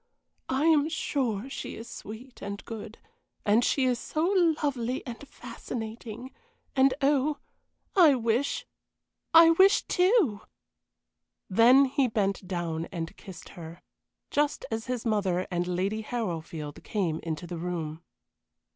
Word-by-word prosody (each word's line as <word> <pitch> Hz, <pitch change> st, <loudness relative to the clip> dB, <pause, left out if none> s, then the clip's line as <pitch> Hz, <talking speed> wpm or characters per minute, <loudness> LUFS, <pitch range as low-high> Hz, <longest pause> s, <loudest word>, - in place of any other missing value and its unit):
"I 265 Hz, +4 st, +1 dB
am 310 Hz, -2 st, +4 dB
sure 260 Hz, -8 st, -1 dB
she 275 Hz, -, -6 dB
is 225 Hz, -, -9 dB
sweet 235 Hz, +5 st, -10 dB
and 200 Hz, 0 st, -6 dB
good; 225 Hz, -1 st, -8 dB, 0.5 s
and 215 Hz, +4 st, +4 dB
she 265 Hz, +2 st, +2 dB
is 250 Hz, -2 st, +1 dB
so 310 Hz, +1 st, -1 dB, 0.4 s
lovely 255 Hz, -3 st, -1 dB
and 240 Hz, -3 st, -7 dB
fascinating 230 Hz, -1 st, -7 dB, 0.4 s
and 265 Hz, -1 st, +4 dB
oh, 285 Hz, +1 st, +2 dB, 0.6 s
I 330 Hz, -7 st, +7 dB
wish 235 Hz, +3 st, 0 dB, 0.7 s
I 330 Hz, 0 st, +8 dB
wish 380 Hz, +4 st, +5 dB
too!" 360 Hz, -, +2 dB, 1.1 s
Then 245 Hz, +7 st, +7 dB
he 270 Hz, 0 st, +1 dB
bent 200 Hz, -4 st, -1 dB
down 170 Hz, -3 st, -2 dB
and 170 Hz, +1 st, -5 dB
kissed 190 Hz, -4 st, -11 dB
her, 170 Hz, -1 st, -10 dB, 0.5 s
just 295 Hz, 0 st, 0 dB
as 225 Hz, +1 st, -3 dB
his 250 Hz, -2 st, -3 dB
mother 195 Hz, -5 st, +1 dB
and 175 Hz, 0 st, -1 dB
Lady 190 Hz, +4 st, -1 dB
Harrowfield 165 Hz, -10 st, -5 dB
came 175 Hz, -7 st, -1 dB
into 160 Hz, 0 st, -4 dB
the 175 Hz, -1 st, -6 dB
room. 165 Hz, -2 st, -4 dB
225 Hz, 130 wpm, -28 LUFS, 185-270 Hz, 1.1 s, I